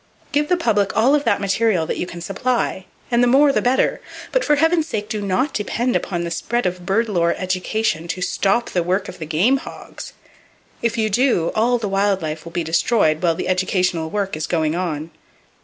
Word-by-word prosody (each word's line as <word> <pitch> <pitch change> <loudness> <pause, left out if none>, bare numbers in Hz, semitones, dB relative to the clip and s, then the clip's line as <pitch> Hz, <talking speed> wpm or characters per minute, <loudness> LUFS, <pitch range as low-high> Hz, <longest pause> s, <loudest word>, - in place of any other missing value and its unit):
Give 295 +1 +1
the 360 - +3
public 210 - +1
all 240 +6 +4
of 295 -1 +2
that 205 -4 +2
material 200 -3 +1
that - - -3
you 175 - -2
can 170 -1 -8
supply, 195 0 -1 0.3
and 235 0 +3
the 245 - +4
more 280 +3 +5
the - - +1
better, 250 +2 +1 0.3
but - - +1
for 295 - +3
heaven's 325 +1 +2
sake 210 -7 -3
do 215 -2 -3
not 245 +9 0
depend 235 +4 -1
upon 175 -3 -1
the 170 - -4
spread 240 +8 -1
of 180 -1 -3
bird 225 +4 +2
lore 170 -5 +1
"education" 185 -1 -1
to 175 +2 -4
stop 195 +5 0
the 180 - +1
work 185 +4 -1
of - - -10
the 160 - -6
game 185 - +3
hogs! - - -10 0.7
If 235 -1 0
you 215 -1 0
do, 230 -7 +2
all 240 +3 +2
the 225 -3 -3
wild 195 -1 +1
life 155 +1 -4
will 170 - -8
be 170 0 -2
destroyed 160 0 +2
while 170 -2 +2
the - - -4
educational 180 -3 0
work 200 0 -2
is 155 0 -3
going 160 -3 0
on. 165 -3 -3
195 Hz, 210 wpm, -20 LUFS, 175-235 Hz, 0.7 s, more